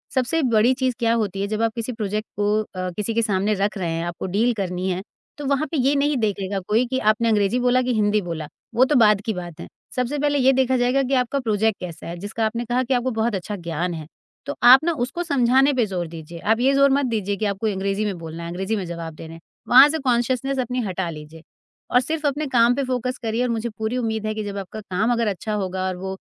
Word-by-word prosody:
सबसे 270 +6 +1
बड़ी 230 +3 +4
चीज़ 260 -1 0
क्या 230 -1 +2
होती 200 -4 -1
है 200 - -1
जब 215 +1 -2
आप 225 -1 +2
किसी 230 +1 -3
प्रोजेक्ट 215 -1 -3
को 210 +1 +2
अ, 185 -3 -5
किसी 210 +2 -2
के 230 - +2
सामने 205 -1 +1
रख 205 +2 -1
रहे 180 -3 -2
हैं, 165 +1 -2
आपको 175 -1 -5
डील 215 +6 +1
करनी 185 -2 -3
है 185 0 -2 0.4
तो 290 - -6
वहाँ 280 +2 +1
पे 320 - -1
ये 270 +2 +3
नहीं 290 +1 +2
देखेगा 200 -3 -1
कोई 225 +4 +2
कि 260 +1 -1
आपने 225 +2 +2
अंग्रेज़ी 210 +3 +2
बोला 250 +1 +3
कि 250 -1 0
हिंदी 210 -1 +2
बोला। 165 -4 -5 0.3
वो 250 - +5
तो 295 - +3
बाद 210 -2 +5
की 220 +1 -2
बात 175 -2 -7
है। - - -7 0.3
सबसे 250 +3 -1
पहले 290 0 +1
ये 265 0 +5
देखा 260 0 +2
जाएगा 250 +2 +2
कि 265 - -2
आपका 265 +3 -2
प्रोजेक्ट 220 -3 0
कैसा 175 -3 -8
है, 170 - -5
जिसका 210 +4 -3
आपने 235 +2 -2
कहा 245 +2 0
कि 255 - -1
आपको 250 +1 0
बहुत 220 -1 +1
अच्छा 200 +3 -4
ज्ञान 170 0 -3
है। 155 -2 -6 0.4
तो 285 - -4
आप 255 +5 +9
ना 340 - +2
उसको 345 +7 -4
समझाने 270 -2 +3
पे 245 -3 +2
ज़ोर 180 -4 -3
दीजिए। 165 +1 -9
आप 220 +6 +1
ये 270 +2 +3
ज़ोर 275 0 +5
मत 280 0 +2
दीजिए 205 -4 -1
कि 215 - -3
आपको 200 +2 -1
अंग्रेज़ी 200 +1 -1
में 195 -4 -2
बोलना 165 0 -7
है, 170 - -5
अंग्रेज़ी 190 +5 -2
में 195 -4 -3
जवाब 170 -1 -6
देने 160 +1 -10
हैं। 165 - -12 0.3
वहाँ 265 +4 +8
से 320 +1 -1
कॉन्शसनेस 260 +1 0
अपनी 250 0 -1
हटा 185 -2 -2
लीजिए 155 0 -10 0.5
और 250 - +5
सिर्फ 310 +3 -3
अपने 290 +1 0
काम 235 +1 +5
पे 280 - -1
फ़ोकस 255 0 -2
करिए 225 +2 -1
और 250 - 0
मुझे 230 0 -2
पूरी 220 +3 -2
उम्मीद 220 -3 -2
है 215 - -1
कि 215 - -3
जब 200 -1 -5
आपका 195 +3 -6
काम 210 +4 -1
अगर 230 -1 0
अच्छा 210 +2 -3
होगा 190 -2 -2
और 185 - -2
वो 190 +1 -5
220 Hz, 255 wpm, -22 LUFS, 190-250 Hz, 0.5 s, आप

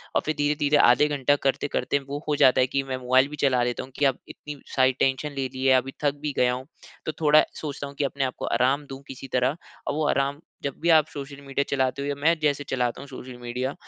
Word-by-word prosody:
और - - +4
फिर 155 - -1
धीरे-धीरे 145 0 +2
आधे 125 +5 +5
घंटा 145 -1 +2
करते-करते 140 +1 0
वो 145 +2 -5
हो 150 - +1
जाता 130 -3 +5
है 130 - +3
कि 135 +1 -1
मैं 130 -1 -4
मोबाइल 130 +2 +3
भी 150 - -7
चला 125 -2 +3
लेता 120 0 -2
हूँ 130 - -12
कि 145 - +3
अब 135 -2 +2
इतनी 150 -2 -9 0.2
सारी 130 -1 +4
टेंशन 135 +3 +1
ले 135 -1 0
ली 130 +1 -4
है, 130 - +6
अभी 135 +1 -3
थक 145 0 +2
भी 150 -2 -2
गया 125 0 +3
हूँ, 130 +2 -6 0.4
तो 155 - -1
थोड़ा 155 0 +6 0.2
सोचता 145 -2 -5
हूँ 140 - -11
कि 145 - -1
अपने 140 0 -1
आप 130 - -2
को - - -4
आराम 135 +4 +1
दूँ 135 0 -8
किसी 135 0 -8
तरह। 130 +5 +1 0.3
और - - 0
वो 155 -1 0
आराम 140 +1 0 0.2
जब 140 -2 -2
भी 170 - +1
आप 155 -2 +6
सोशल 140 0 -8
मीडिया 140 0 -1
चलाते 135 0 0
हो 140 - -3
या 145 - -1
मैं 165 +2 +5
जैसे 145 -1 +1
चलाता 125 -1 -1
हूँ 140 - -10
सोशल 130 -1 -9
मीडिया, 125 +3 -3
140 Hz, 255 wpm, -25 LUFS, 130-145 Hz, 0.4 s, है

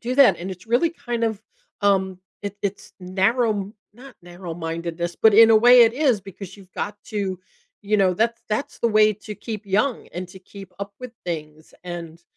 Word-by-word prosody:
do 245 +2 -3
that, 275 -1 +6
and 180 +3 -5
it's 180 +1 -10
really 245 +9 +2
kind 240 -7 -3
of, 220 -2 -2 0.4
um, 190 -2 +1 0.2
it 205 0 -5
it's 200 0 -4
narrow 195 +6 +1
m 200 0 -5 0.2
not 255 +2 -14
narrow 175 0 -8
mindedness, 170 +1 -4
but 220 - +5
in 225 +1 +8
a 220 - +7
way 245 +2 +7
it 230 -1 +4
is 260 -6 +2
because 195 0 -10
you've 190 -2 -17
got 205 - -4
to, 195 -4 -3 0.4
you 210 +1 +1
know, 190 -2 +3
that's 230 +4 0
that's 215 +6 -2
the 235 - +2
way 215 -1 +5
to 210 +1 -9
keep 215 -1 -7
young 210 +7 0
and 180 +1 -6
to 190 - -12
keep 195 0 -13
up 200 0 -6
with 250 -2 -8
things, 155 -2 -6
and, 170 -1 -7
200 Hz, 200 wpm, -23 LUFS, 180-225 Hz, 0.4 s, in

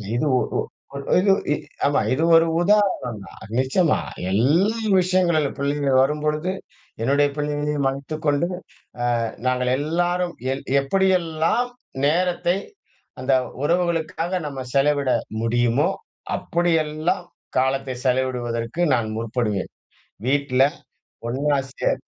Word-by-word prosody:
இது, 120 - +1
ஓ - - +4 0.6
ஓ - - -5
ஓ - - +1
இது 195 +1 +4 0.2
இ - - +3 0.3
ஆமா 145 - +2
இது 135 +5 0
ஒரு 165 0 +5
உதாரணம் 185 - +2
தான். - - -13 0.2
நிச்சயமா 150 +6 +2 0.3
எல் 100 +4 +2 0.6
விஷயங்களில் 175 -5 +2
பிள்ளைகள் 140 -1 +2
வரும்பொழுது, 150 +4 0 0.5
என்னுடைய 140 +4 +3
பிள்ளைகளையும் 145 -1 -1
மறைத்துக் 140 +4 -3
கொண்டு, 145 +4 +2 0.7
அ - - 0 0.2
நாங்க 125 0 +1
எல்லாரும் 175 +4 0 0.2
எல் 135 - -6 0.2
எப்படியெல்லாம் 185 - +1 0.4
நேரத்தை 175 +3 +1 0.6
அந்த 130 +1 +2 0.3
உறவுகளுக்காக 170 +1 0 0.2
நம்ம 140 -2 -6
செலவிட 140 0 +2 0.3
முடியுமோ, 120 +5 +2 0.5
அப்படியெல்லாம் 165 -1 0 0.4
காலத்தை 130 0 0
செலவிடுவதற்கு 125 +1 -1
நான் 115 -3 -1
முற்படுவேன். 110 -3 -2 0.6
வீட்ல 135 -1 +2 0.7
ஒண்ணா 140 +4 +1 0.2
சேர் - - -1
145 Hz, 105 wpm, -23 LUFS, 130-170 Hz, 0.7 s, ஒரு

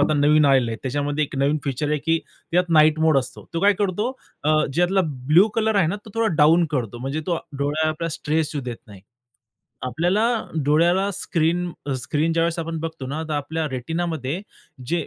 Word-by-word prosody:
आता 150 +1 +3
नवीन 150 +1 +4
आलेलं 130 -4 +4
आहे, 115 - -3
त्याच्यामध्ये 145 +3 -1
एक 140 - -9
नवीन 140 +3 +2
फीचर 140 +2 -2
आहे, 150 0 +1
की 165 +3 +1 0.3
त्यात 180 0 +2
नाईट 155 -1 +5
मोड 160 -3 +4
असतो. 130 -1 -7
तो 165 - 0
काय 205 +2 +5
करतो 210 +4 0 0.6
ज्यातला 175 +5 +2 0.3
ब्लू 170 +9 +6
कलर 220 -1 +1
आहे 190 -5 +4
ना, 180 - -1
तो 215 - -11
थोडा 225 0 +1
डाउन 165 +4 +5
करतो. 120 -5 -3
म्हणजे 135 +5 -3
तो 170 -2 0 0.2
डोळ्याला 155 +3 -1
स्ट्रेस 155 0 -1
येऊ 145 - -2
देत 120 -2 -5
नाही. 100 -3 -13 0.9
आपल्याला 175 - +1 0.4
डोळ्याला 170 +7 +3
स्क्रीन 175 +1 0 0.2
अ, 140 - -1
स्क्रीन 155 +4 0
ज्यावेळेस 165 +1 0
आपण 165 0 -3
बघतो 160 -4 -5
ना 150 +4 -3
तर 155 - -3
आपल्या 160 +2 -2
रेटिनामध्ये 160 +3 -3 0.5
जे 170 +4 -1
155 Hz, 185 wpm, -22 LUFS, 145-170 Hz, 0.9 s, ब्लू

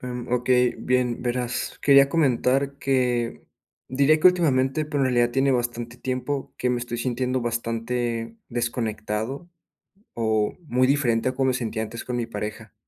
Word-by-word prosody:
Em, 125 -1 -5
okey, 125 0 +3
bien, 125 -2 0
verás, 125 0 -2
quería 140 -1 +6
comentar 140 -2 +1
que 125 -4 0 0.5
diría 140 +4 +3
que 155 - +5
últimamente, 155 -5 +3
pero, 150 -1 -3
en - - +3
realidad 120 -2 +2
tiene 135 +2 +2
bastante 120 -1 -2
tiempo 130 +2 -3
que 125 - 0
me 125 - 0
estoy 120 0 -5
sintiendo 125 +1 -1
bastante 115 0 -2
desconectado, 115 +4 -3 0.7
o 110 -2 0
muy 130 -1 +2
diferente 130 -4 +2
a 130 - -3
como 135 0 +1
me 130 - +2
sentía 115 -3 -2
antes 115 +1 -6
con 125 - -3
mi 120 -1 -2
pareja. 105 -1 -6
125 Hz, 155 wpm, -24 LUFS, 115-135 Hz, 0.7 s, quería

